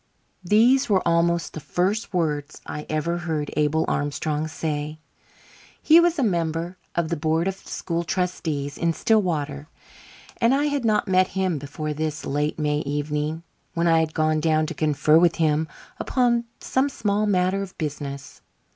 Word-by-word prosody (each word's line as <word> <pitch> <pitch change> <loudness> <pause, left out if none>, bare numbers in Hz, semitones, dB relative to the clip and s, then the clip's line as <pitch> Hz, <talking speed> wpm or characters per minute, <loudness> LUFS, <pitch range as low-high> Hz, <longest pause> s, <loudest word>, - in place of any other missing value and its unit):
These 235 +8 +4
were 190 -4 +2
almost 170 0 +1
the - - -5
first 185 +8 -1
words 155 -5 -2
I 150 - -6
ever 160 +3 -1
heard 160 -4 -3
Abel 150 +1 +2
Armstrong 150 +1 -1
say. 155 -1 -3 0.8
He 320 +2 +6
was 345 0 +3
a 280 - +1
member 170 -2 -1 0.2
of 170 -2 0
the 170 - 0
board 160 +2 0
of 195 - 0
school 170 -3 -4
trustees 160 -6 -2
in 170 0 +1
Stillwater, 155 -9 0 0.7
and 235 +3 +3
I 285 - +1
had 285 -4 0
not 215 -1 +2
met 185 0 +4
him 185 -5 0
before 150 +2 -4
this 155 0 -3
late 145 +2 -1
May 150 -1 0
evening, 150 +2 -2 0.3
when 170 0 +1
I 165 -1 +5
had 160 -1 -1
gone 155 -1 +2
down 155 0 +2
to 165 - -4
confer 150 +1 +3
with 170 -1 +4
him 155 -1 +1 0.3
upon 240 -2 +1
some 265 +2 0
small 210 -4 0
matter 185 0 +1
of 195 -2 -7
business. 140 -3 -5
165 Hz, 160 wpm, -24 LUFS, 150-190 Hz, 0.8 s, He